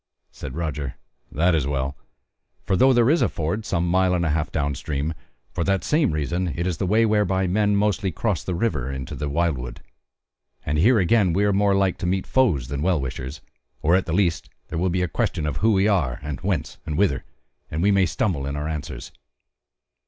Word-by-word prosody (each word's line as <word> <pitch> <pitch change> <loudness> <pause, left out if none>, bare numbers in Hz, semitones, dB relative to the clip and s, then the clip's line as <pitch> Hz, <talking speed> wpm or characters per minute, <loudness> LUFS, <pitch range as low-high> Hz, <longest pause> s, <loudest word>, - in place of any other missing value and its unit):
Said 70 -2 -8
Roger: 75 -5 -3 0.4
"That 85 +4 +2
is 75 -4 +1
well, 70 -1 -2 0.7
for 95 - +1
though 130 +8 +5
there 120 -2 +4
is 165 - +3
a - - +3
ford 85 +8 -3
some 85 +1 0
mile 90 +1 +3
and 85 -1 0
a 80 - +1
half 75 -1 -1
down 75 -2 -1
stream, 75 +3 -3 0.4
for 85 - -1
that 95 +1 +1
same 150 0 +2
reason 80 +3 -1
it 85 - -2
is 90 -3 -1
the 95 - -1
way 110 +4 +4
whereby 100 -3 +2
men 105 +3 +2
mostly 100 -2 +1
cross 100 0 -1
the 90 - -3
water 85 - -1
into 65 -1 -6
the 75 -1 -3
wildwood; 70 -6 -1 0.9
and 75 +1 0
here 115 +8 +5
again 95 -1 +3
we 100 +4 +2
are 100 - +2
more 100 0 +3
like 95 -2 +1
to - - -2
meet 95 +1 0
foes 90 - +2
than 70 +1 -4
well 90 0 +2
wishers; 65 +2 -5 0.4
or 85 +4 +4
at 95 -1 +1
the - - -2
least 85 -3 +1 0.2
there 80 - -3
will 90 +2 +1
be 90 +1 0
question 75 0 -1
of 75 -3 -2
who 110 +6 +3
we 95 +1 +3
are, 80 - +1
and 75 -3 -5
whence - - -2
and 75 - -4
whither; 80 -9 +1 0.5
and 80 +3 -2
we 100 - +4
may 95 -2 +3
stumble 75 -11 -1
in 70 - -3
our 75 +1 -3
answers." 70 -4 -5
85 Hz, 210 wpm, -23 LUFS, 75-100 Hz, 0.9 s, though